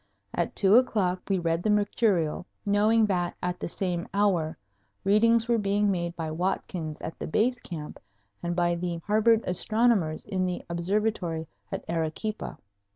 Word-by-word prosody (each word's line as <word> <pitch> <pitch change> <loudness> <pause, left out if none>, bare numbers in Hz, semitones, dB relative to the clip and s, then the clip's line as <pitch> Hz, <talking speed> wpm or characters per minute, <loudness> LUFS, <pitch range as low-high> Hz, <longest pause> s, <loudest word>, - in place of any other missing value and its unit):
At - - -1
two 200 +2 +6
o'clock 190 -8 +2
we 195 - +2
read 165 -1 0
the 215 - 0
mercurial, 205 -5 +1 0.2
knowing 215 +2 +4
that 180 -4 -1
at 180 0 -2
the - - -3
same 175 0 -2
hour 185 -6 +1 0.5
readings 225 +3 +4
were 235 -1 +2
being 205 0 +2
made 170 -2 -2
by 160 -2 -4
Watkins 165 -2 -2
at 160 - -6
the - - -4
Base 245 +9 +1
Camp 155 -4 -7 0.4
and 175 0 -2
by 175 -1 +2
the 170 0 -2
Harvard 220 +2 +4
astronomers 200 -3 +1
in 185 -1 -1
the 180 - -4
Observatory 175 -2 -1 0.2
at - - -4
Arequipa. 165 +6 -3
185 Hz, 155 wpm, -27 LUFS, 170-210 Hz, 0.5 s, two